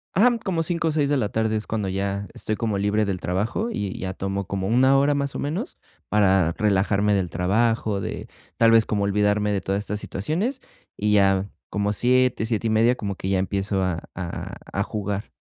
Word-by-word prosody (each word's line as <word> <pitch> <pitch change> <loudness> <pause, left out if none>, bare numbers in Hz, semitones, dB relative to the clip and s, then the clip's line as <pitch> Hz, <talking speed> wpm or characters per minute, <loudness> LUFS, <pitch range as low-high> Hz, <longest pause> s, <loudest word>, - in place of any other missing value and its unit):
Ajá, 235 +5 +5
como 170 -4 0
5:00 165 0 -1
o - - +2
6:00 150 -2 +1
de 145 -1 +2
la 105 -5 0
tarde 110 0 0
es 110 - -3
cuando 105 -3 -2
ya 100 +1 -2
estoy 110 - -3
como 110 -3 -1
libre 105 +1 +1
del 95 -2 -2
trabajo 110 - -1
y 100 - -3
ya 95 0 -3
tomo 95 0 -3
como 95 -1 -2
1 130 +4 +4
hora, 140 +1 +3
más 140 -1 -2
o - - -3
menos, 180 - -3 0.3
para 95 -5 +3
relajarme 105 0 +2
del 95 -3 0
trabajo, 105 +2 +1
de - - -5 0.3
tal 115 0 +5
vez, 115 -1 +5
como 100 -2 0
olvidarme 105 +1 +1
de 100 -2 0
todas 100 +1 -1
estas 105 +1 -3
situaciones, 165 - -2 0.4
y 105 0 +1
ya 95 -1 +3 0.2
como 105 0 0
7:00, 125 -1 +2
7 115 -1 -1
y - - +1
media, 115 +3 +4
como 100 -4 -4
que 95 - -4
ya 95 - +2
empiezo 95 0 -1
a 85 -3 -3
a 85 -2 -5 0.2
a 100 - +1
jugar. 105 -1 -4
105 Hz, 205 wpm, -24 LUFS, 100-120 Hz, 0.4 s, Ajá